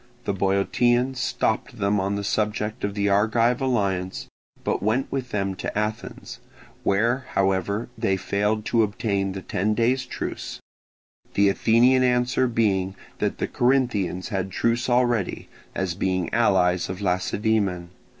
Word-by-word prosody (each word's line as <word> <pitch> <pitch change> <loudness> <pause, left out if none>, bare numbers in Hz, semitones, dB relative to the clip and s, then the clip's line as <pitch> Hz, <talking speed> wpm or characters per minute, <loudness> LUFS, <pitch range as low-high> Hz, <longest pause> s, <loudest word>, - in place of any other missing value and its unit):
The 100 - 0
Boeotians 120 +7 +1
stopped 120 0 -1
them 100 0 +1
on 100 +2 -1
the 100 - -3
subject 105 +2 -1
of 100 0 -2
the 100 -1 +1
Argive 115 +5 +2
alliance, 100 -8 -1 0.4
but - - -1
went 110 +6 0
with 130 -2 -3
them 100 -3 -1
to - - -4
Athens, 105 +1 -4 0.4
where 115 +6 +1
however 95 +3 +1
they 105 -4 0
failed 105 +3 -1
to 115 - +2
obtain 100 -2 -1
the 95 -1 -6
ten 105 +4 0
days' 125 +3 +1
truce; - - -5 0.8
the 100 0 +5
Athenian 120 +6 +4
answer 125 0 +2
being 100 -5 0 0.2
that - - -1
the - - -1
Corinthians 120 -8 0
had 95 -3 -2
truce 115 +6 0
already, 120 -5 +1 0.3
as 95 -2 -1
being 95 0 -1
allies 95 -6 +2
of 90 0 -5
Lacedaemon. 95 -1 0
105 Hz, 140 wpm, -24 LUFS, 95-120 Hz, 0.8 s, the